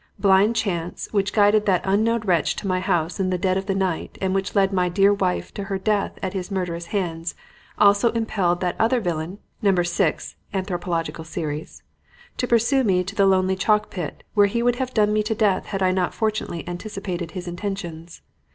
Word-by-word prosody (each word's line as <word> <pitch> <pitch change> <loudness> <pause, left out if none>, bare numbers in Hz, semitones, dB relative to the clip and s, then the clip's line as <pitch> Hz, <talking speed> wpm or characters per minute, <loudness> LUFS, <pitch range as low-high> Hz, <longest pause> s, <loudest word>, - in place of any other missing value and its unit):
Blind 200 +3 +4
chance, 175 -6 -2
which 200 -1 +1
guided 210 0 +4
that 185 -3 +3
unknown 220 +4 +2
wretch 180 -6 +1
to - - -6
my 185 -1 +1
house 175 -1 -1
in 190 -1 +1
the 185 - 0
dead 185 +1 +1
of 190 +1 -2
the 195 - 0
night 190 -4 -2
and 190 -1 0
which 195 0 -2
led 195 -1 +3
my 180 -1 +2
dear 195 +3 +4
wife 185 -3 -1
to 200 - -5
her 195 0 -2
death 205 +1 0
at 190 0 -2
his 185 -1 -4
murderous 175 -3 -3
hands, 170 -4 -3 0.4
also 205 +3 +5
impelled 195 -6 0
that 180 -1 0
other 235 +3 +3
villain 175 -2 -3 0.2
(Number 190 -4 +3
6, 175 -1 -1 0.2
Anthropological 175 -4 -2
Series) 155 -2 -5 0.5
to 250 - -1
pursue 240 +4 +3
me 185 -5 +2
to 195 +2 -6
the 200 -1 +3
lonely 190 0 +3
chalk 210 +2 +1
pit, 175 -6 -5
where 205 -2 +5
he 235 +4 -1
would 245 0 +2
have 260 -1 -2
done 210 -2 +2
me 215 - +2
to 215 +1 -1
death 205 -4 +1
had 195 -2 -2
I 185 - +3
not 185 -1 -1
fortunately 215 -6 -2
anticipated 180 -2 -5
his 180 0 -6
intentions. 175 -3 -6
190 Hz, 195 wpm, -23 LUFS, 175-210 Hz, 0.5 s, also